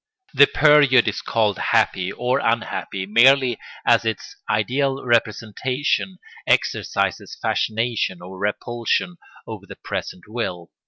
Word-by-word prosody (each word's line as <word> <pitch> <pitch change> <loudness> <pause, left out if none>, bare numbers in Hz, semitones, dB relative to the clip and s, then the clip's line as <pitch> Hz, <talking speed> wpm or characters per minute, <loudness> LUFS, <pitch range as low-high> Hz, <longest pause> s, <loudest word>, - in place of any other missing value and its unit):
The 140 - +6
period 145 -5 +4
is 105 - -2
called 105 -4 0
happy 95 0 +1
or 125 +4 -1
unhappy 110 -5 -2
merely 125 +3 +4 0.3
as - - +4
its 110 -2 -4
ideal 135 +6 0
representation 125 - -1 0.3
exercises - - -1
fascination 110 -4 -1
or 95 +1 -11
repulsion 120 - -2 0.3
over - - -9
the - - -10
present 90 - -6
will. 90 -7 -5
115 Hz, 110 wpm, -21 LUFS, 105-130 Hz, 0.3 s, The